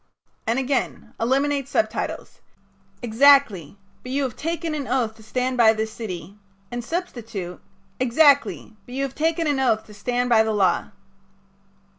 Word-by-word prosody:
'" - - -42
And 230 +2 +1
again: 270 0 -2
"Eliminate 275 +3 +1
subtitle: 330 - -1 0.8
'Exactly 230 - +4 0.2
but 255 - -8
you 280 +1 0
have 255 -4 -3
taken 330 0 -3
an 285 -3 -4
oath 245 -4 0
to - - -15
stand 250 +3 -2
by 225 -2 +6
this 220 0 -3
city,' 200 -3 -7 0.3
and 240 0 -4
substitute: 230 - -5 0.4
'Exactly, 270 -2 +3
but 245 - -8
you 275 - -1
have 270 -1 -3
taken 325 +3 0
an 290 -3 +1
oath 220 -4 +1
to 210 - -14
stand 245 +4 -1
by 230 -2 +5
the 220 0 0
law.'" 195 -3 +1
245 Hz, 155 wpm, -23 LUFS, 220-280 Hz, 0.8 s, by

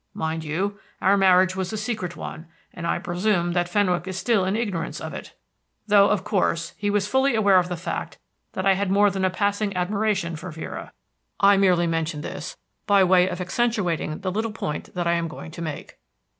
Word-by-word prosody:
Mind 160 0 -2
you, 190 +7 -2 0.2
our 195 +1 +4
marriage 185 -1 +4
was 190 -1 -3
a 215 - -3
secret 210 -5 -3
one, 160 - -8 0.3
and 170 -1 -5
I - - +1
presume 175 0 0
that 175 0 0
Fenwick 180 -3 +1
is 190 -1 -4
still 215 -3 +2
in 190 +2 0
ignorance 205 -7 -2
of - - -6
it, - - -9 0.5
though, 205 -1 +5
of 205 -3 +1
course, 180 -5 0
he 205 - -2
was 205 -1 +1
fully 265 +3 +2
aware 200 -4 +5
of 180 0 -2
the 180 - -3
fact 170 - -5 0.4
that 185 - -3
I 195 - +6
had 195 0 -1
more 205 +1 +4
than 190 0 -2
a 185 - +3
passing 200 +1 -1
admiration 195 -2 0
for 180 +4 -7
Vera. 160 0 -7 0.5
I 200 0 +6
merely 185 -3 +3
mention 165 -2 -1
this - - -6 0.3
by 200 -2 +5
way 185 0 +4
of 180 0 -5
accentuating 180 -5 -1
the 185 -1 -2
little 220 +4 -1
point 150 -7 -5
that 175 -1 -1
I 170 - +2
am 170 -1 0
going 160 0 -9
to 170 - -8
make. 155 -3 -6
185 Hz, 205 wpm, -24 LUFS, 175-205 Hz, 0.5 s, I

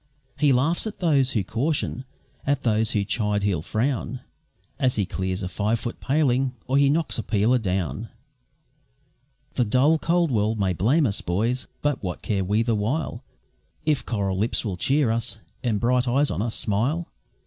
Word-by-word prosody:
He 150 -2 +4
laughs 145 - +2
at 215 - -6
those 140 -7 +2
who 105 - +1
caution, 130 - -1 0.4
at 140 -1 0
those 110 -1 +2
who 105 - +1
chide 105 -1 0
he'll 95 -6 +1
frown, 125 - -2 0.6
As 130 -1 +2
he 100 - +1
clears 95 +1 -3
a - - -1
five 105 +4 0
foot 120 - -5
paling, 135 -2 +1
or 130 - -1
he 140 -1 +5
knocks 155 -3 0
a - - -2
peeler 110 +4 +2
down. 90 - -2 1.4
The 125 - +2
dull, 130 +8 +3
cold 170 -1 +1
world 110 -1 +1
may 95 -2 +1
blame 125 - +2
us, 100 - 0
boys! 115 +9 -1 0.2
but 145 -2 0
what 90 -3 -5
care 100 -3 0
we 105 +4 +1
the 115 0 0
while, 115 +4 -2 0.6
If 155 -3 +1
coral 100 -4 -1
lips 110 +3 0
will 100 -4 -2
cheer 135 - +2
us, 115 -1 -1 0.3
and 115 -4 +1
bright 125 +2 +2
eyes 140 +4 +2
on 90 - -2
us 115 0 -1
smile? 125 +12 0
115 Hz, 175 wpm, -24 LUFS, 105-135 Hz, 1.4 s, he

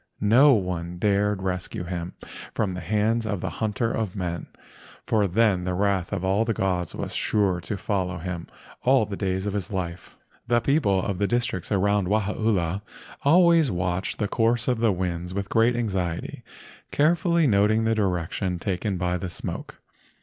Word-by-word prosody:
No 125 +8 +6
one 90 -4 -2
dared 100 +1 +1
rescue 90 -1 -3
him 90 0 -5 0.4
from 100 -4 0
the 90 - -4
hands 110 +5 +1
of 105 -3 -2
the - - -3
hunter 110 +2 0
of 110 -5 -2
men—for 95 +3 -4
then 100 -1 +2
the 90 0 -2
wrath 95 -2 0
of 95 -2 -2
all 100 +4 +2
the 115 -2 -1
gods 90 -2 -1
was - - -4
sure 95 -4 +1
to 100 - -4
follow 95 -3 -2
him 90 0 -5 0.3
all 130 -3 +4
the 100 -1 -5
days 95 -1 -2
of 105 - -2
his 100 -1 -3
life. 90 -4 -5 0.3
The 120 0 +3
people 110 - +2
of 95 -2 -2
the 100 - +2
districts 120 -6 -1
around 100 -1 +2
Wahaula 100 -3 0 0.4
always 165 0 +5
watched 90 -1 -2
the 105 - 0
course 115 +2 +1
of 125 -3 +1
the 115 -2 +3
winds 90 -1 -3
with 100 -1 -3
great 115 +2 +3
anxiety, 95 -8 -2 0.5
carefully 170 +2 +2
noting 110 -1 +3
the 115 0 +2
direction 90 -2 -1
taken 95 +2 -2
by 90 0 0
the 90 - -4
smoke. - - -7
100 Hz, 165 wpm, -25 LUFS, 90-110 Hz, 0.5 s, No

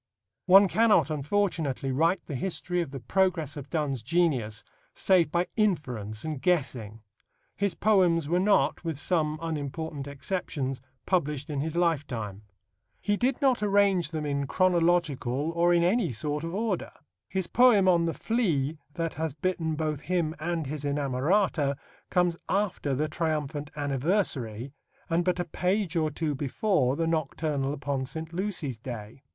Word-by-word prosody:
One 195 +2 +8
cannot, 220 -4 +3
unfortunately, 150 -3 -1
write 165 +6 +1
the - - -6
history 180 +4 -2
of 170 - -4
the 135 0 -6
progress 165 - 0
of 145 -2 -8
Donne's 145 -6 -1
genius 125 -7 0 0.3
save 180 -5 +3
by 175 +1 +1
inference 125 - -1
and 155 -4 -4
guessing. 125 - -1 0.5
His 200 -4 0
poems 180 -7 +3
were 175 +3 +2
not, 185 -8 +2
with 165 -4 -3
some 155 0 0
unimportant 150 -2 -4
exceptions, 140 -3 -3 0.2
published 150 -4 0
in 140 -2 -1
his 160 +2 -3
lifetime. 135 - -1 0.6
He 205 - 0
did 250 +4 0
not 260 -5 +3
arrange 200 -5 +3
them 155 -2 -3
in 140 -1 -1
chronological 165 -6 +1
or 170 +1 +3
in 170 -1 +4
any 200 - +2
sort 145 +6 -2
of 165 +2 -4
order. 215 -3 -2 0.4
His 190 -2 -1
poem 220 -2 +5
on 170 -2 +4
the 165 - -1
flea 160 - 0 0.2
that 165 -1 -2
has 160 -3 -3
bitten 160 -1 -1
both 155 -2 -2
him 165 -1 0
and 165 0 -2
his 145 +1 -5
inamorata 145 +2 +1 0.3
comes 180 -2 +2
after 190 -8 0
the 150 +4 0
triumphant 150 -2 -2
Anniversary, 140 - -1 0.4
and 170 +1 +2
but 180 0 0
a 175 - 0
page 185 -1 -1
or 155 -2 +2
two 150 0 -2
before 140 - +1
the 165 - 0
Nocturnal 155 -3 -1
upon 140 -2 -2
St. 160 +3 -6
Lucy's 170 - -2
Day. 115 0 -8
160 Hz, 150 wpm, -28 LUFS, 140-180 Hz, 0.6 s, One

